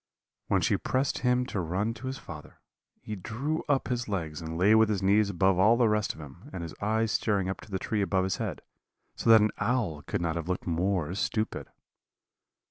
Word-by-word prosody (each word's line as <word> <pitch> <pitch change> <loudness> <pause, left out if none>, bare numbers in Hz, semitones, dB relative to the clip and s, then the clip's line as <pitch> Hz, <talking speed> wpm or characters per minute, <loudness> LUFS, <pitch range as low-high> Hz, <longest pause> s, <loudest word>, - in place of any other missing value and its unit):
"When - - +2
she - - +2
pressed 130 +1 -1
him 125 0 +2
to 105 - -3
run 95 +6 -1
to 120 +3 -8
his 130 0 -3
father, 75 - -11 0.4
he 105 - -5
drew 130 - -3
up 140 -2 +2
his 120 -1 -2
legs 80 -6 -3
and 80 0 -5
lay 100 +5 +5
with 110 0 +5
his 100 -3 -1
knees 100 +2 +4
above 95 0 +2
all 110 +5 +5
the 120 -2 +4
rest 105 -1 0
of - - -13
him, 80 - -11
and 90 - -5
his 80 -2 -6
eyes 110 +1 +1
staring 100 -4 +1
up 95 - -4
to - - -14
the 95 - -2
tree 105 +2 -1
above 95 -1 +1
his 95 -1 -1
head, - - -4 0.5
so - - -1
that 110 -1 +9
an 105 - +2
owl 110 -12 0
could - - -3
not 85 -1 -1
have 85 +1 -5
looked 90 - -2
more 90 -1 0
stupid. 110 +2 -2
100 Hz, 215 wpm, -28 LUFS, 90-115 Hz, 0.5 s, that